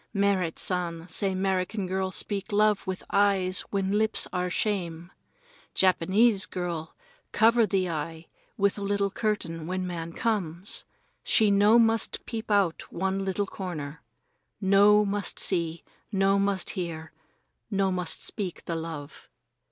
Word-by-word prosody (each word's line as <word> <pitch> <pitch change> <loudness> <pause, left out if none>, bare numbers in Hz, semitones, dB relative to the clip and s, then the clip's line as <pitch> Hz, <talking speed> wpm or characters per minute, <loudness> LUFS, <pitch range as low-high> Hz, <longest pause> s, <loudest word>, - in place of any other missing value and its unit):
Merrit 195 -4 +1
San 170 -2 -1
say 190 +3 0
'Merican 190 +1 -1
girl 190 +1 -1
speak 200 +1 -3
love 210 -1 +2
with 185 0 -4
eyes 195 -2 +3
when 195 -1 -1
lips 220 0 +1
are 180 0 -1
shame. 175 -3 -2 0.6
Japanese 190 +3 +3
girl 170 -3 -4 0.4
cover 230 0 +4
the 185 -1 +1
eye 160 0 -4 0.3
with 200 0 +1
little 200 0 0
curtain 170 -7 -2
when 185 +1 -2
man 170 -2 -5
comes. 195 -5 -2 0.4
She 215 -3 +3
no 205 +3 +5
must 225 -1 +2
peep 225 -1 -5
out 200 -5 +1
one 190 +2 -1
little 195 +1 -1
corner. 160 -7 -6 0.6
No 205 +1 +5
must 200 -1 -2
see, 170 -3 +1 0.3
no 195 0 +3
must 200 -1 +1
hear, 165 -3 -5 0.6
no 195 -2 +1
must 180 -3 0
speak 190 -5 -3
the 170 - -3
love. 160 -3 -7
190 Hz, 130 wpm, -27 LUFS, 170-205 Hz, 0.6 s, no